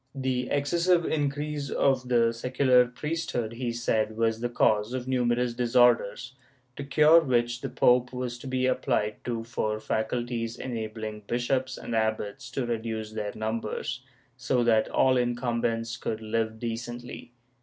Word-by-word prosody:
The 130 -2 -1
excessive 170 +4 +2
increase 145 -1 -2
of 130 -2 +1
the 115 -2 +3
secular 125 +1 +3
priesthood, 125 -4 -3
he 120 0 -3
said, 110 -2 -1
was 115 -1 +1
the 120 +1 -2
cause 110 -1 +2
of 130 -1 -4
numerous 125 -1 +1
disorders, 120 0 +2 0.4
to 140 - -5
cure 150 +3 +6
which 120 -4 0
the - - -3
pope 125 0 +3
was 125 -1 -4
to 135 - -9
be 130 0 -1
apphed 105 -4 0
to 115 -2 -2
for 110 -2 -2
faculties 115 +1 -2
enabling 110 -3 -5
bishops 130 +2 -1
and 115 - -5
abbots 110 -2 -1
to 130 - -2
reduce 110 -2 -3
their 105 -1 -4
numbers, 110 +3 -3 0.4
so 125 0 +1
that 110 -2 +3
all 130 -1 +3
incumbents 120 -2 -1
could 110 - -3
live 110 0 -2
decently. 120 +1 -6
120 Hz, 145 wpm, -27 LUFS, 115-130 Hz, 0.4 s, cure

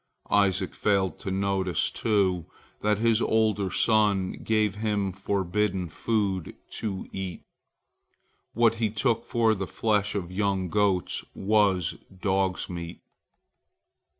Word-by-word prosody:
Isaac 95 -2 +2
failed 95 -4 +1
to - - -5
notice, 95 0 0
too, 95 -6 +1 0.3
that 105 0 +2
his 115 +1 +2
older 110 -3 +2
son 105 -3 +3
gave 110 -2 +2
him 105 -2 -1
forbidden 95 0 -1
food 100 -1 -1 0.2
to 100 -4 -4
eat. 95 -2 -5 1.1
What 115 -1 +4
he 110 - +2
took 115 +2 0
for 115 -2 +2
the 95 -3 -3
flesh 105 -1 0
of 90 -3 -3
young 95 -1 0
goats 100 -2 +1
was 100 -4 +2 0.2
dog's 95 -1 0
meat. 85 -1 -7
100 Hz, 115 wpm, -27 LUFS, 95-105 Hz, 1.1 s, What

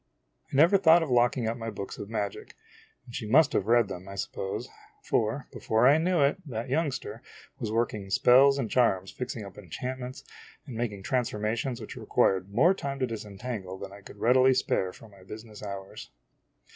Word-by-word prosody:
I - - -4
never 170 +8 +6
thought 165 -2 +6
of 150 - -4
locking 120 -1 +2
up 115 +1 -2
my 115 -1 -5
books 100 -2 -7
of 100 - -7
magic 105 -3 -4 0.5
and 120 - -13
she 115 -3 -4
must 140 +5 +5
have 100 - 0
read 120 -2 +4
them, 95 0 -8
I 100 - -7
suppose; 95 0 -4 0.4
for, 120 - 0
be - - -8
fore 110 +3 +3
I 145 +3 +6
knew 175 -1 +2
it, 140 +1 +3
that 120 -1 -5
youngster 140 -2 -2 0.4
was 110 - -3
working 110 -3 -1
spells 135 +7 +5
and 130 -5 -1
charms, 95 -6 +1
fixing 125 -4 -5
up 100 0 -11
enchantments, 125 - -6 0.4
and 130 -5 -8
making 110 -4 -3
trans 125 0 0
formations 115 +4 -2
which 110 - -8
required 95 0 +1
more 135 - +4
time 140 -7 -4
to 130 - 0
disentangle 105 -3 -6
than 100 0 -8
I 100 - -12
could 100 - -13
readily 130 +4 +4
spare 95 -6 0
from 110 +3 -15
my 100 -1 -17
business 105 +3 -10
hours. 100 -2 -7
115 Hz, 190 wpm, -28 LUFS, 100-130 Hz, 0.5 s, never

